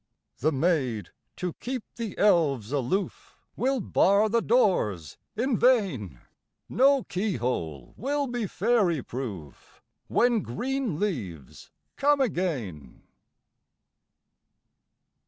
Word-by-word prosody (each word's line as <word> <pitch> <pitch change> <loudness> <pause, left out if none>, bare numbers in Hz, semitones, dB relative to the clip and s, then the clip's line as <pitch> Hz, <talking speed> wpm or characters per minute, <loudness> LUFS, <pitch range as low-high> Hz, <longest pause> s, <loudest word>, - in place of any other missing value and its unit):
The 155 +4 +2
maids, 130 - 0 0.2
to 180 -2 -3
keep 250 -2 -4
the 230 -4 -5
elves 145 - +3
aloof, 145 +8 -2 0.2
Will 265 +1 0
bar 200 +1 +3
the 230 +2 +2
doors 180 - +1 0.2
in 240 +2 0
vain; 180 - +2 0.5
No 275 +1 +4
key 195 +1 -2
hole 80 - -3
will 285 +4 -1
be 245 -4 -3
fairy 185 - +1
proof, 100 - -8 0.3
When 240 -2 +3
green 245 - -3
leaves 100 - -4 0.3
come 290 0 +3
again. 135 - -2
180 Hz, 100 wpm, -27 LUFS, -, 0.5 s, No